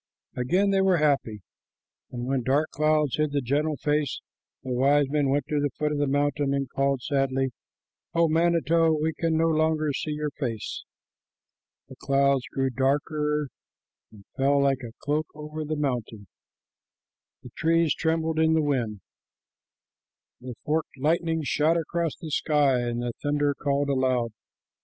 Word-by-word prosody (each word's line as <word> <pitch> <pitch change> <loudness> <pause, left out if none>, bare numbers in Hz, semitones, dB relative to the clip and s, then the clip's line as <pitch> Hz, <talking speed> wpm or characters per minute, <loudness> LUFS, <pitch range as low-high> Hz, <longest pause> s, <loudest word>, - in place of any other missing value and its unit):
Again 180 +11 +1
they 195 -1 +3
were 190 -2 +3
happy, 140 -9 0 0.7
but 120 - -6
when 130 +1 -1
dark 140 +5 +1
clouds 155 -2 +1
hid 155 -1 0
the 145 - +2
gentle 145 +4 0
face, 145 -1 0 0.4
the 130 - -5
wise 140 +3 +3
men 145 -2 +1
went 140 0 +1
to 150 - +1
the 145 0 +1
foot 150 0 0
of 150 - -1
the 145 - +1
mountain 145 0 +1
and 135 -1 -1
called 135 -2 0
sadly, 135 -2 0 0.6
"O 170 0 +4
manito, 165 0 +3
we 160 +1 0
can 165 0 0
no 165 - +3
longer 155 -2 +1
see 150 +2 -3
your 150 0 -3
face." 115 -6 -5 1.0
The 130 - -13
clouds 140 0 +2
grew 135 -1 0
darker 150 +3 0 0.6
and 100 -3 -16
fell 140 +1 +2
like 135 -1 +1
a 115 -2 -8
cloak 150 +1 0
over 150 +1 -6
the 155 +1 -3
mountain, 120 -7 -3 1.2
the - - -11
trees 165 -1 +2
trembled 160 0 0
in 160 0 +4
the 160 -1 +2
wind, 120 -8 -1 1.4
the 125 -1 -8
forked 155 -1 -1
lightning 160 +3 0
shot 155 +3 +2
across 165 0 -2
the 160 -3 -8
sky, 145 -4 +2
and 120 0 -2
the 120 -1 -3
thunder 145 0 +1
called 140 0 -1
aloud. 130 -3 +1
145 Hz, 155 wpm, -26 LUFS, 135-155 Hz, 1.4 s, O